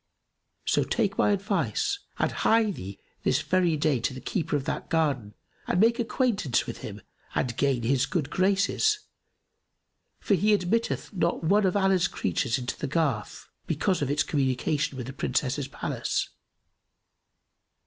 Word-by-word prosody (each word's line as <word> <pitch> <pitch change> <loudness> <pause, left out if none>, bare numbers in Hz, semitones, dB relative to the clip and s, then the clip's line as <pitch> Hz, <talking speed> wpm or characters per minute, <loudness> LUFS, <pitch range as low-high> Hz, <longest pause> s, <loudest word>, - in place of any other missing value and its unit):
So - - +2
take 205 -4 0
my - - +4
advice 195 - 0 0.2
and - - +1
hie 220 -1 +3
thee 100 - -7 0.2
this - - +1
very 180 -4 +2
day 150 -4 +2
to 130 +3 -2
the - - -6
keeper 160 +1 -2
of 140 -2 -1
that - - -3
garden 140 -10 0 0.3
and 180 - +1
make 230 +3 +4
acquaintance 225 - +1
with - - -6
him 105 -1 -8 0.3
and 120 -3 0
gain 135 -3 +1
his 135 +3 +2
good 150 -1 -2
graces, 200 - +2 1.2
for - - +1
he 210 +3 +4
admitteth 220 +5 -1
not 170 -3 0
one 195 +4 +4
of 185 - +1
Allah's 190 -2 +3
creatures 125 -9 -1
into 125 -1 -3
the - - -2
garth, 140 -8 -1 0.2
because 170 +4 0
of 140 - 0
its 145 +1 +2
communication 140 0 0
with 125 - -4
the 135 - -7
Princess's 140 0 -1
palace. 140 - -2
160 Hz, 150 wpm, -27 LUFS, 135-200 Hz, 1.2 s, my